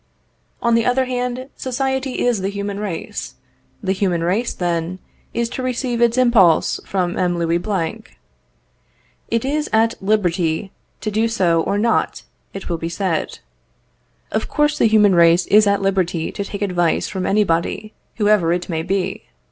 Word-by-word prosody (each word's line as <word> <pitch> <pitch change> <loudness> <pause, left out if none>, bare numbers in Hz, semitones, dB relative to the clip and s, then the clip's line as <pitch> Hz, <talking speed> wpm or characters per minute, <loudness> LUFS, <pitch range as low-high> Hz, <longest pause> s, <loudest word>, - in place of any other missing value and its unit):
On 235 -1 +3
the 230 0 +3
other 255 +2 +2
hand, 250 0 -3
society 265 0 -2
is 240 -5 +1
the 190 - -1
human 200 0 -4
race. 195 -6 -5 0.5
The 190 - 0
human 185 -3 0
race, 205 +8 0
then, 170 0 -2 0.3
is 235 0 -1
to 260 - -5
receive 250 -1 -2
its 235 +1 +3
impulse 230 -10 +4
from 180 -2 -1
M. 175 -1 +1
Louis 170 0 +1
Blanc. 200 +2 -4 1.1
It 230 +2 0
is 300 +2 -1
at 225 +1 +3
liberty 185 -3 0 0.3
to 215 - -2
do 220 +2 +1
so 180 -7 +2
or 200 - -1
not, 230 +3 0 0.3
it 195 - -7
will 170 -2 -2
be 165 - -3
said. 170 -2 -2 0.9
Of - - -1
course 295 0 +1
the - - +5
human 210 -2 +5
race 170 0 +5
is 210 +1 +5
at 200 0 +2
liberty 180 -4 0
to 200 - -4
take 200 0 -5
advice 175 -4 +1
from 190 -3 -3
anybody, 205 +1 0 0.2
whoever 205 -6 +3
it 175 +1 -2
may 160 -2 -1
be. 190 +3 -2
200 Hz, 160 wpm, -20 LUFS, 175-230 Hz, 1.1 s, the